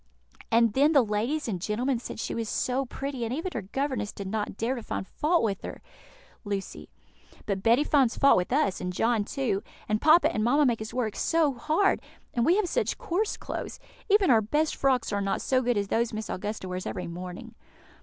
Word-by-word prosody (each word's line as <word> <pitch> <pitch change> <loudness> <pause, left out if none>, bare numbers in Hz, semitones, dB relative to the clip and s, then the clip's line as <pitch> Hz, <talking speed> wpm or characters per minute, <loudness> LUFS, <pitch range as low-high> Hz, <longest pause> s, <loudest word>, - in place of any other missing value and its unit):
_ - - -27
"And 230 -1 +4
then 290 +5 +4
the 275 -4 +6
ladies 230 +9 -1
and 185 -6 -3
gentlemen 235 +6 0
said 235 - -7
she - - -3
was 230 -2 -3
so 260 +2 0
pretty, 270 -1 -4
and 230 - -2
even 325 +8 -3
her 230 - -2
governess 225 +1 -2
did 200 - -7
not 210 0 -3
dare 230 +3 0
to 250 - -5
find 205 - -4
fault 325 - +1
with 200 -3 -1
her!" - - -7 0.6
Lucy. 200 -2 -5 0.6
"But 195 -2 -2
Betty 235 +7 +4
finds 275 -6 +2
fault 275 - +6
with 180 +4 0
us, 285 -7 +1
and 180 - -2
John, 225 +3 +1
too; 215 -6 -1 0.3
and 215 0 0
papa 320 +3 +5
and 215 - 0
mamma 285 +6 +4
make 235 -4 +1
us 220 - -5
work 235 -4 -2
so 320 -4 +2
hard! 315 +10 +1 0.3
and 235 0 +1
we 345 - +5
have 415 -2 +1
such 485 +8 -1
coarse 435 -2 -1
clothes! - - -6 0.3
Even 400 -4 +5
our 225 -2 +5
best 300 +9 0
frocks 260 -5 +1
are 200 - 0
not 195 0 -1
so 255 -1 +1
good 245 -2 +1
as 200 -1 -1
those 230 0 0
Miss 215 0 -4
Augusta 205 0 -4
wears 185 0 -4
every 180 - -4
morning." 180 +1 -7
235 Hz, 215 wpm, -27 LUFS, 210-285 Hz, 0.6 s, the